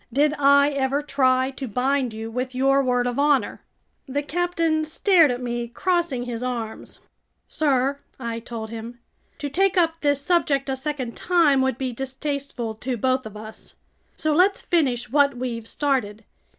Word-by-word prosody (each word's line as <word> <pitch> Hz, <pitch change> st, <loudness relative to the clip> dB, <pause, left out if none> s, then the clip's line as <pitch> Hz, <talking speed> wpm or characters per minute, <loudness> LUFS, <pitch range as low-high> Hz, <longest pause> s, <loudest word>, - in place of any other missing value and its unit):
"Did 290 Hz, +4 st, +3 dB
I 280 Hz, +1 st, +5 dB
ever 275 Hz, +1 st, 0 dB
try 260 Hz, -2 st, +2 dB
to 270 Hz, 0 st, -6 dB
bind 255 Hz, +2 st, 0 dB
you 220 Hz, +1 st, -6 dB
with 255 Hz, +2 st, -3 dB
your 275 Hz, +1 st, +3 dB
word 245 Hz, -2 st, +1 dB
of 245 Hz, +1 st, -2 dB
honor?" 285 Hz, -2 st, +2 dB, 0.5 s
The 285 Hz, +2 st, -2 dB
captain 330 Hz, -1 st, 0 dB
stared 330 Hz, +1 st, +4 dB
at 245 Hz, 0 st, -3 dB
me, 240 Hz, -1 st, -3 dB
crossing 340 Hz, -1 st, -1 dB
his 240 Hz, -1 st, -5 dB
arms. 235 Hz, -3 st, -5 dB, 0.5 s
"Sir," 275 Hz, -2 st, +1 dB, 0.2 s
I 230 Hz, -2 st, -4 dB
told 225 Hz, -1 st, -7 dB
him, 230 Hz, +1 st, -7 dB, 0.4 s
"to 290 Hz, -, -4 dB
take 380 Hz, +7 st, +1 dB
up 330 Hz, -2 st, +2 dB
this 285 Hz, -2 st, +2 dB
subject 285 Hz, -4 st, +1 dB
a 265 Hz, -, 0 dB
second 265 Hz, -3 st, -4 dB
time 325 Hz, -7 st, +3 dB
would 265 Hz, -2 st, 0 dB
be 260 Hz, -2 st, -3 dB
distasteful 270 Hz, -2 st, -4 dB
to 255 Hz, -1 st, -2 dB
both 255 Hz, +1 st, 0 dB
of 215 Hz, -1 st, -10 dB
us. 215 Hz, +1 st, -11 dB, 0.4 s
So 310 Hz, -1 st, 0 dB
let's 370 Hz, +5 st, +3 dB
finish 255 Hz, -10 st, 0 dB
what 280 Hz, -2 st, +3 dB
we've 235 Hz, -3 st, -4 dB
started. 240 Hz, -8 st, -1 dB
270 Hz, 165 wpm, -23 LUFS, 245-290 Hz, 0.5 s, I